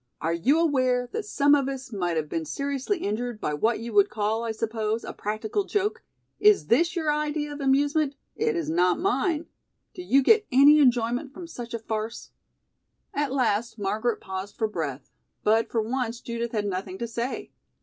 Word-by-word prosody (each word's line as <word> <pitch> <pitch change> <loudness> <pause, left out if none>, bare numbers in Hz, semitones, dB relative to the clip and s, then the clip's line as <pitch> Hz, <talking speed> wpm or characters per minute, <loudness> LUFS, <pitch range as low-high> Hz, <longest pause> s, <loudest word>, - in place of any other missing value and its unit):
Are 165 +1 -1
you 260 - +2
aware 255 -6 +2
that 445 -1 -3
some 285 -6 +3
of 275 -2 +3
us 270 -1 -6
might 175 -4 -1
have 155 -1 -1
been 165 +2 -2
seriously 280 - -2
injured 235 -3 -3
by 150 - -2
what 220 +10 +1
you 230 0 -6
would 205 -1 +5
call, 215 +2 -1
I 230 - -2
suppose, 220 0 -2
a - - -6
practical 215 - -2
joke? 410 +1 -1 0.4
Is 420 -1 +5
this 335 +9 +2
your 315 -3 +1
idea 295 0 -2
of 290 - -7
amusement? 285 +2 +2 0.2
It 455 -1 0
is 335 - -2
not 180 +2 +2
mine. 345 -3 0 0.5
Do 360 - -7
you 275 -6 +3
get 430 - +5
any 285 +4 +7
enjoyment 245 0 +2
from 360 - -7
such 240 -8 -7
a - - -3
farce?" 220 0 -5 0.8
At 290 -2 -1
last 235 -3 0
Margaret 215 +3 -1
paused 190 +1 -6
for 220 - 0
breath, 155 -9 -5 0.3
but 220 +2 +3
for 225 -2 0
once 240 0 -2
Judith 235 -1 -4
had 210 -3 -1
nothing 190 -1 -4
to 235 - -3
say. 235 +3 -4
240 Hz, 185 wpm, -26 LUFS, 215-290 Hz, 0.8 s, any